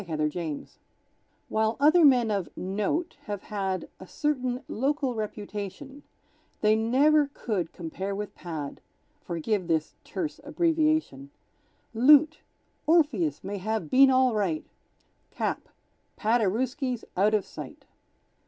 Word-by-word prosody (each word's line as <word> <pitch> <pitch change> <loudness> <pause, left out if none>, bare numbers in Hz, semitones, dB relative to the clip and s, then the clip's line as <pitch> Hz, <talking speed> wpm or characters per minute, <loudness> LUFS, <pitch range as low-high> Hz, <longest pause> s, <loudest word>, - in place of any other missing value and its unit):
Paderewski 155 -1 -3 0.8
While 220 +1 0
other 310 +4 +6
men 250 -6 +5
of 195 -4 -1
"note" 210 - -2
have 205 -2 -5
had 195 -3 -3
A 185 - -11
certain 255 -2 -1
local 270 +2 -1
reputation, 215 +5 -6 0.6
They 215 0 +4
never 280 +7 +4
could 190 -8 -2
compare 190 +4 -5
with 210 0 -5
Pad, 155 -5 -6 0.4
(Forgive 180 +2 -2
this 160 -2 0
terse 300 +2 -4
abbreviation), 310 - 0 0.6
Loot: 295 +6 +6 0.5
Orpheus 265 - +2
may 200 +1 -4
have 215 -4 -3
been 270 +1 +7
All 255 -2 +4
Right; 190 -7 -1 0.6
Cap: - - -3 0.5
Paderewski's 240 +4 0
Out 210 +4 +3
of 210 - 0
Sight! - - -10
220 Hz, 110 wpm, -27 LUFS, 190-275 Hz, 0.8 s, been